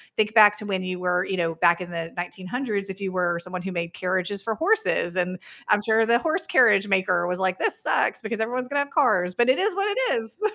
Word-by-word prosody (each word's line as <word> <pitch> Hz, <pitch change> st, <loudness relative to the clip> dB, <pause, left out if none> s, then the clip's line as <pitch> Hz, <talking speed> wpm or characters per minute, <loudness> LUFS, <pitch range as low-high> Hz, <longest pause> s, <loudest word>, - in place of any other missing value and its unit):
think 215 Hz, 0 st, 0 dB
back 210 Hz, -2 st, +6 dB
to 210 Hz, -, -6 dB
when 190 Hz, -2 st, -2 dB
you 185 Hz, -1 st, -5 dB
were, 180 Hz, 0 st, 0 dB
you 190 Hz, -1 st, -4 dB
know, 165 Hz, -1 st, -1 dB
back 170 Hz, +1 st, +2 dB
in 175 Hz, -, -8 dB
the 165 Hz, -1 st, -5 dB
1900s, 200 Hz, +4 st, -4 dB
if 190 Hz, +1 st, -8 dB
you 195 Hz, -1 st, -4 dB
were 175 Hz, -2 st, -1 dB
someone 180 Hz, +1 st, -6 dB
who 190 Hz, +1 st, -6 dB
made 170 Hz, -1 st, -4 dB
carriages 185 Hz, +2 st, -2 dB
for 220 Hz, +1 st, -3 dB
horses, 390 Hz, -, +1 dB
and 180 Hz, 0 st, -2 dB, 0.3 s
I'm 210 Hz, 0 st, +2 dB
sure 225 Hz, 0 st, +3 dB
the 235 Hz, -, +4 dB
horse 325 Hz, +6 st, -1 dB
carriage 210 Hz, -5 st, +4 dB
maker 185 Hz, -3 st, +1 dB
was 180 Hz, 0 st, -2 dB
like, 185 Hz, -1 st, -1 dB
"This -, -, +5 dB
sucks -, -, 0 dB
because 220 Hz, 0 st, -4 dB
everyone's 250 Hz, +3 st, -3 dB
gonna 285 Hz, -, -1 dB
have 285 Hz, 0 st, -2 dB
cars, 180 Hz, -8 st, +1 dB
but 240 Hz, +1 st, +2 dB
it 260 Hz, -, +3 dB
is 405 Hz, 0 st, 0 dB
what 395 Hz, +1 st, -1 dB
it 415 Hz, -, -2 dB, 0.2 s
is." 225 Hz, -, -4 dB
195 Hz, 245 wpm, -23 LUFS, 180-230 Hz, 0.3 s, back